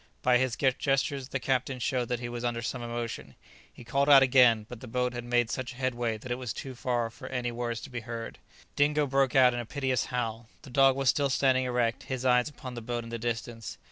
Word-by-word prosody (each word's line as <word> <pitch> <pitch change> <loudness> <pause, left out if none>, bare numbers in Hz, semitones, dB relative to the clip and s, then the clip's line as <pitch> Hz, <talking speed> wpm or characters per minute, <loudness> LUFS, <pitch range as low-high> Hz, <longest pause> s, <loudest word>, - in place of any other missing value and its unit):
By 125 -1 +4
his 130 -2 0
gestures 135 0 0
the 135 - -2
captain 130 +1 -1
showed 125 0 -1
that 125 0 -2
he 120 - -4
was 120 0 -5
under 120 -1 -2
some 125 +2 -3
emotion; 120 -1 -5 0.4
he - - -13
called 140 +4 +1
out 135 -2 +9
again, 125 -4 +5
but 125 -1 -9
the 130 - -10
boat 125 +1 -1
had 120 -1 -5
made 120 -1 +1
such 125 0 -4
headway 120 -3 -1
that 125 +3 -9
it 120 - -1
was 125 -5 -4
too 135 - -7
far 120 -1 -1
off 115 - -7
for - - -9
any 125 -2 -2
words 120 -1 -3
to - - -10
be 125 - -3
heard. 115 0 -7 0.4
Dingo 150 +1 +3
broke 135 0 +1
out 130 -2 +6
into 120 - -2
a - - -8
piteous 130 -1 -1
howl. 115 -2 -3
The 135 - -12
dog 135 +1 +5
was 135 -1 +1
still 140 -1 +2
standing 130 -1 +2
erect, 120 -2 0
his 130 -1 -4
eye 125 -1 +5
upon 130 0 -6
the 120 - -6
boat 120 +1 -3
in 115 - -10
the 115 - -4
distance. 115 -1 -4
125 Hz, 240 wpm, -29 LUFS, 120-130 Hz, 0.4 s, out